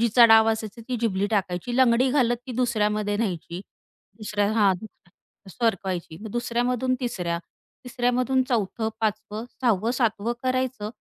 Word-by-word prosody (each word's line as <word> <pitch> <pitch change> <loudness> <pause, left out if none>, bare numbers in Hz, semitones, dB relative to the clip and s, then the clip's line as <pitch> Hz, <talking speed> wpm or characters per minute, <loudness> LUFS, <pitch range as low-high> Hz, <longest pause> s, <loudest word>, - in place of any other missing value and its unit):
जिचा 235 +1 +6
डाव 225 0 +6
असायचा, 220 0 -4
ती 250 - -1
झिबली 200 -4 0
टाकायची, 195 +2 -1
लंगडी 255 0 +4
घालत 250 -3 +2
ती 255 - -5
दुसऱ्यामध्ये 210 -4 0
न्यायची, 180 -5 -3 0.6
दुसऱ्या 210 -1 -1
हां. 205 -4 +4
दुस 190 -2 -17
सरकवायची, 190 -7 -1
मग 220 - -7
दुसऱ्यामधून 245 +2 0
तिसऱ्या, 180 -9 -2 0.5
तिसऱ्यामधून 250 +1 +1
चौथं, 220 -1 -1
5 215 -2 0
वं, 215 +2 -5 0.2
6 245 -3 +4
वं, 230 - +1
7 230 -5 0
वं 230 +4 -1
करायचं 255 -4 -1
225 Hz, 145 wpm, -25 LUFS, 205-245 Hz, 0.6 s, जिचा